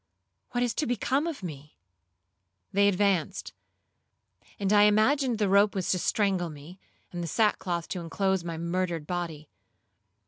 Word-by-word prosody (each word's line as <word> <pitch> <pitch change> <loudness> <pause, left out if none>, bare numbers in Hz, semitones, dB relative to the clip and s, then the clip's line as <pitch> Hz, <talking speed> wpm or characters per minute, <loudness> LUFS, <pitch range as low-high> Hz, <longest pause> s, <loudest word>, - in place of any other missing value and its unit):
—what 245 0 0
is 245 - 0
to 300 - -1
become 265 +5 0
of 310 - -5
me?' 150 -4 -8 1.0
They 200 +1 +4
advanced, 195 -4 0 1.1
and 200 0 +1
I 205 0 +7
imagined 235 +4 +3
the 210 -2 +1
rope 200 +2 +4
was 190 -2 0
to 185 - +1
strangle 190 -3 +1
me, 155 +5 -12 0.3
and 175 - -4
the 170 - -3
sackcloth 175 -3 0
to 180 - -3
inclose 190 +2 0
my 165 -1 -5
murdered 170 -1 -2
body. 165 -3 -4
190 Hz, 145 wpm, -28 LUFS, 170-210 Hz, 1.1 s, I